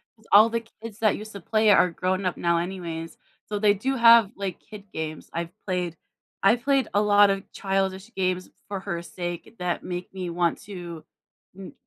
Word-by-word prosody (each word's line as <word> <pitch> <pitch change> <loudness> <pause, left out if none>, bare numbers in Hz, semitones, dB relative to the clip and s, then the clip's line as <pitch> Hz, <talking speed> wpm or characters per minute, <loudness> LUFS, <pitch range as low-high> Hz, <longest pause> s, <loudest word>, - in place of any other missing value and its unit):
'Cause 220 -1 -25
all 215 +3 +8
the 230 0 -1 0.2
kids 225 -1 -8
that 215 -3 +2
used 215 +1 -9
to 200 - -8
play 215 +4 +2
are 180 -2 +5
grown 185 +3 -1
up 180 - -1
now 170 0 +2
anyways. 170 -2 -5 0.3
So, 210 -1 -3
they 205 -1 +5
do 260 +7 -1
have, 230 -4 +7
like, 195 -3 -4
kid 210 -2 -12
games. 155 -1 -5
I've 170 0 -3
played 180 -3 -2 0.5
I've 225 +5 +4
played 275 -1 +2
a 205 - +3
lotta 205 -2 +4
childish 195 +1 -2
games 185 -1 -1 0.2
for 200 -1 -4
her 175 -4 -4
sake 175 +3 -6
that 180 -1 -2
make 180 0 -6
me 185 -2 -4
want 170 0 0
to 175 -5 -8 0.5
m 195 -1 -9
195 Hz, 185 wpm, -25 LUFS, 175-210 Hz, 0.5 s, all